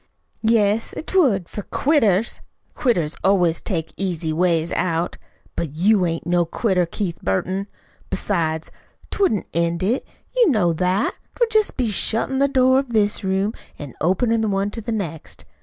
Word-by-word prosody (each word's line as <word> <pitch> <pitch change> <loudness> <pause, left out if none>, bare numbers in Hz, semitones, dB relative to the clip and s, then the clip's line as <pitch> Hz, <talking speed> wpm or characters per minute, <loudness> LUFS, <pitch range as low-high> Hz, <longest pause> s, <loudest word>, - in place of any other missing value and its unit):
"Yes, 220 -1 +2
'twould 245 - +2
for 210 - -6
quitters. 230 - +1 0.3
Quitters 175 - 0
always 180 -4 +3
take 165 -6 -3
easy 170 -4 -2
ways 170 -1 +1
out. 170 -1 -1 0.4
But 155 -3 -4
you 190 +2 +3
ain't 165 -1 -3
no 175 0 +2
quitter, 180 +1 0
Keith 170 -1 -3
Burton. 185 - -1 0.4
Besides, 160 -5 -1 0.4
't - - -5
wouldn't 220 - +2
end 170 +1 0
it. 230 +8 0 0.3
You 485 -5 +5
know 205 - +2
that. 185 +5 0 0.2
'Twould 475 -2 +1
jest 435 -1 +2
be 255 - +1
shuttin' 230 +6 +1
the 280 - +4
door 260 -1 +4
of 270 -3 -5
this 210 -2 +2
room 190 +3 0 0.2
an' 145 -5 -8
openin' 220 +8 +2
the 220 - 0
one 200 +1 0
to 225 - -6
the 230 - -4
next. 170 -8 -5
195 Hz, 155 wpm, -21 LUFS, 170-230 Hz, 0.4 s, You